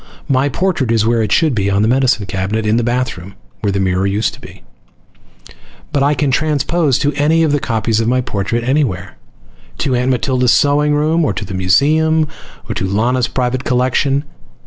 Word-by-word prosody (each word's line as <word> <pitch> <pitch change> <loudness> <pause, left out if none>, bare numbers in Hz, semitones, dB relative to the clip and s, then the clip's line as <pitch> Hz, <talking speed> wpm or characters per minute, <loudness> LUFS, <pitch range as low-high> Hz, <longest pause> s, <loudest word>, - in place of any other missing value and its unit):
My 135 +1 +1
portrait 170 -6 -1
is 110 -2 +2
where 115 0 +2
it 105 -2 -2
should 155 +3 +2
be 100 -3 0
on 100 +1 +1
the - - +2
medicine 125 -3 +1
cabinet 95 +3 -2
in 110 +2 +2
the 120 - 0
bathroom, 115 -6 -3 0.2
where 105 - -1
the 100 - -1
mirror 95 0 0
used 100 +3 -1
to - - -14
be. - - -14 1.3
But 140 - +1
I 145 +2 +2
can 140 +1 0
transpose 150 0 +1
to 145 0 0
any 155 +3 +2
of 155 - +1
the 145 - +1
copies 110 -3 -1
of 115 - 0
my 130 +2 +2
portrait, 115 0 -2
anywhere. 120 - -1 0.6
To 135 - -1
Aunt 125 +1 0
Matilda's 125 0 +1
sewing 145 +1 +2
room, 155 +3 +1
or 105 - 0
to 100 +2 -5
the 95 - -8
museum, 155 +12 +2 0.4
or - - -3
to 95 - -2
Lana's 120 +6 0
private 130 0 -2
collection. 130 +3 +1
125 Hz, 190 wpm, -16 LUFS, 105-145 Hz, 1.3 s, is